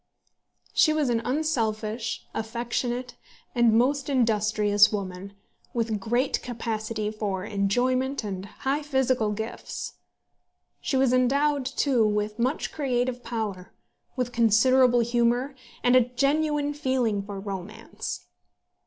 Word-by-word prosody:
She 310 - +4
was 300 -4 +1
an 230 -1 +1
unselfish, 230 -6 -1
affectionate, 240 +2 -3 0.4
and 240 -3 +4
most 275 +4 +1
industrious 215 -4 +3
woman, 195 -1 -5 0.4
with 225 -2 0
great 240 +6 0
capacity 220 -3 -3
for 200 -3 -3
enjoyment 250 +7 0
and 195 -2 -5
high 270 +8 -2
physical 260 -6 +1
gifts. 220 +2 -5 0.8
She 270 - -1
was 260 -1 +3
endowed 280 +2 +2
too, 270 -3 +2
with 210 +1 0
much 255 +6 0
creative 250 -3 -1
power, 215 -6 -4 0.4
with 250 -2 -2
considerable 240 +2 +4
humour, 240 +3 +1 0.3
and 245 +1 +4
a 255 - +8
genuine 290 +3 0
feeling 260 -8 0
for 200 0 -7
romance. 195 0 -6
240 Hz, 110 wpm, -26 LUFS, 215-260 Hz, 0.8 s, a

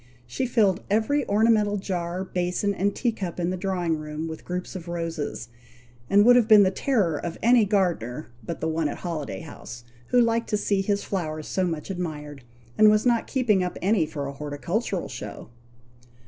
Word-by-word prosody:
She 125 - -2
filled 210 -6 +2
every 225 +8 +1
ornamental 210 -1 +3
jar, 180 -2 -3
basin, 180 +2 -1
and 200 +1 0
tea 240 - +1
cup 185 -6 -5
in 175 +1 0
the - - -1
drawing 175 -4 -1
room, 155 +1 -5
with 160 -1 -7
groups 180 +2 -5
of 180 -2 -7
roses, 165 -6 -4 0.6
and 205 +1 +5
would 245 +1 +8
have 240 -3 +4
been 215 -2 +8
the 190 - +3
terror 195 - 0
of 170 -1 -5
any 235 -1 +5
gardener 170 - -1
but 170 - -6
the 160 - 0
one 160 -1 0
at - - -5
Holiday 165 -5 -4
House, 120 -6 -10 0.2
who 250 - +3
liked 230 -1 +2
to 210 - +1
see 200 -1 +1
his 200 +1 0
flowers 155 -5 -3
so 190 - 0
much 160 +2 -4
admired, 150 -6 -5 0.4
and 215 0 +8
was 215 +2 +3
not 235 -2 +2
keeping 225 -8 +2
up 180 - -4
any 190 -4 +2
for 145 -2 -5
a 140 - -5
horticultural 160 - -3
show. 105 +1 -8
185 Hz, 190 wpm, -25 LUFS, 160-210 Hz, 0.6 s, would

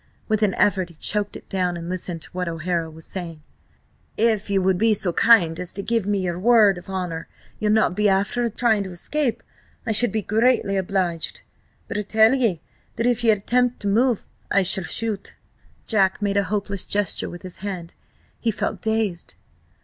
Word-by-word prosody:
With 215 -1 0
an 205 -3 +2
effort 190 -3 +2
he 170 - -16
choked 205 +5 0
it - - -17
down 180 -2 -1
and 170 0 -7
listened 175 -2 -3
to - - -12
what 180 -1 -3
O'Hara 165 0 -2
was 160 0 -10
saying: 165 -5 -7 0.7
"If 220 -3 +1
ye 200 - +2
will 190 0 +3
be 215 +4 +3
so 185 -3 0
kind 175 -9 +4
as 180 -1 -3
to 200 - -5
give 230 -3 0
me 205 -1 +1
your 175 -1 -2
word 210 -3 +5
of 175 - -15
honour 180 -4 -4 0.3
ye'll 210 -1 +1
not 215 -5 +3
be 210 +1 +2
afther 205 +5 +1
trying 220 -2 +1
to - - -6
escape, 250 +8 -2 0.4
I - - -1
should 235 +3 +3
be 215 -1 -1
greatly 220 -1 +2
obliged. 185 -3 -2 0.4
But 210 - -3
I - - 0
tell 220 +3 +4
ye 245 -7 +2
first 160 - -17 0.3
that 230 - -1
if 245 -1 +1
ye 230 - +4
attempt 240 +4 +2
to 205 - -3
move, 235 +3 +2 0.2
I 195 - +3
shall 185 0 +3
shoot." 215 -4 -3 0.5
Jack 195 -4 +2
made 200 -1 0
a 200 - +2
hopeless 200 0 -2
gesture 205 -3 -1
with 175 - -10
his 185 -1 -6
hand. 185 -4 -6 0.5
He 230 - 0
felt 215 - -2
dazed. 220 -6 -1
200 Hz, 195 wpm, -23 LUFS, 180-220 Hz, 0.7 s, word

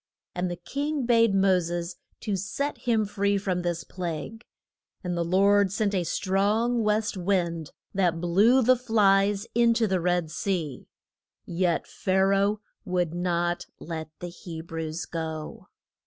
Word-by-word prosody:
And 180 0 -1
the 175 - -3
king 285 - -3
bade 230 -4 +4
Mo 190 -1 +4
ses 170 0 -4 0.2
to 210 -3 -1
set 240 +10 -2
him 225 -3 +1
free 200 0 0
from 185 -2 -1
this 175 -1 -2
plague. 180 +5 -5 0.6
And 180 -1 -2
the 170 - 0
Lord 195 +3 +3
sent 205 0 0
a 180 -3 0
strong 210 +7 +1
west 215 0 +1
wind, 175 -4 0 0.2
that 180 -4 +1
blew 205 +10 +4
the 255 +2 +5
flies 205 -4 +3
in 235 0 +4
to 225 - +2
the 190 -4 0
Red 175 -2 0
Sea. 160 -6 -3 0.6
Yet 175 -1 0
Pha 185 - -2
ra 195 0 +3
oh 210 0 -2 0.2
would 180 -5 -1
not 175 0 -1
let 160 -2 -6
the 175 - -4
He 170 -1 -8
brews 160 0 -5
go. 160 -2 -5
190 Hz, 155 wpm, -26 LUFS, 175-210 Hz, 0.6 s, the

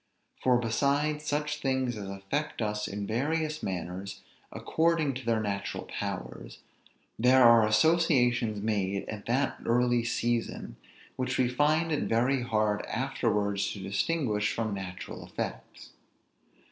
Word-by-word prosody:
For 125 -1 +4
besides 140 +6 0
such 150 0 -1
things 130 -2 0
as 100 -2 -6
affect 100 +11 -3
us 105 -1 -1
in 100 +1 -4
various 155 +7 -1
manners, 95 +1 -5 0.3
according 160 -3 +1
to 130 -1 -7
their 115 -1 +2
natural 100 -2 -3 0.2
powers, - - -5 0.6
there 125 +2 +6
are 115 -2 +7
associations 120 -5 +3
made 100 -3 -1
at 105 -1 -7
that 130 +4 0
early 120 0 +2
season, 120 0 -2 0.4
which 130 - -1
we 130 - +3
find 150 +6 +2
it 150 - 0
very 125 +4 +2
hard 110 -3 0
afterwards 105 -6 0
to 100 - -8
distinguish 105 - 0
from 110 -2 -2
natural 95 -2 -6
effects. - - -7
120 Hz, 125 wpm, -29 LUFS, 105-140 Hz, 0.6 s, are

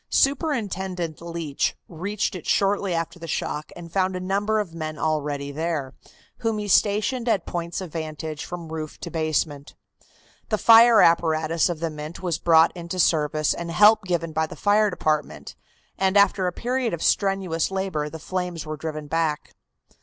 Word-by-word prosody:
Superintendent 190 - 0
Leach 170 -4 -2
reached 195 +6 -3
it 180 -4 -8
shortly 195 -2 +1
after 165 +1 -3
the 165 - -8
shock 150 -1 -3
and 170 -1 -10
found 190 -1 +1
a - - -3
number 200 +4 0
of 195 -6 -4
men 155 -2 -5
already 145 -2 -2
there, 155 -3 -3 0.4
whom 225 -2 -1
he 210 -1 -4
stationed 215 +5 +2
at 195 -6 +1
points 170 +1 -4
of 180 -4 -7
vantage 155 -1 -5
from 175 -2 -7
roof 155 -1 -6
to 170 - -6
basement. 155 -2 -2 0.7
The 215 - +1
fire 230 0 +7
apparatus 165 0 +2
of 170 -2 -4
the 165 -1 -1
Mint 155 +4 -8
was 170 -3 -1
brought 165 0 +5
into 170 +1 -6
service 155 -3 +2
and 170 0 -6
help 210 +5 +5
given 170 -2 -1
by 160 0 0
the - - -9
fire 210 +1 +3
department, 150 - -2 0.4
and 190 +1 +2
after 195 -2 +4
a - - 0
period 245 0 -1
of 165 - -7
strenuous 195 -5 +1
labor 190 -6 -2
the 160 - -8
flames 180 -1 -4
were 155 0 -5
driven 155 -1 -5
back. 160 0 -2
170 Hz, 170 wpm, -24 LUFS, 155-195 Hz, 0.7 s, fire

